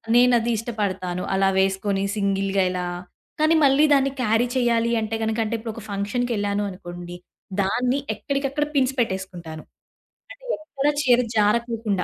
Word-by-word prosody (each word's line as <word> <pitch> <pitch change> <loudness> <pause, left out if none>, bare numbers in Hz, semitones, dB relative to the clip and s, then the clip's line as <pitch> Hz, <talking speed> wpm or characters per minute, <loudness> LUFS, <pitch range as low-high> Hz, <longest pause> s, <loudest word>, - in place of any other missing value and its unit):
నేనది 240 -1 +4
ఇష్టపడతాను. 195 -5 -3
అలా 195 0 +3
వేసుకొని 195 +1 +1
సింగిల్‌గా 195 -1 +1
ఇలా 180 -1 -2 0.5
కానీ 310 +2 +4
మళ్ళి 275 +1 +5
దాన్ని 275 -1 +3
క్యారీ 225 0 +2
చేయాలి 235 -2 +2
అంటే 220 0 -2
గనక 220 0 -1
అంటే 220 +1 -2
ఇప్పుడొక 225 0 -7
ఫంక్షన్‌కెళ్ళాను 205 0 -1
అనుకోండి. 175 -2 -8 0.5
దాన్ని 250 +7 +1 0.2
ఎక్కడికక్కడ 280 +1 -1
పిన్స్ 265 -1 +2
పెట్టేసుకుంటాను. 185 -7 -3 0.7
అది - - -18
ఎక్కడ 295 -3 -3
చీర 250 -4 +4 0.2
జారకోకుండా 215 -2 +1
220 Hz, 125 wpm, -23 LUFS, 195-245 Hz, 0.7 s, మళ్ళి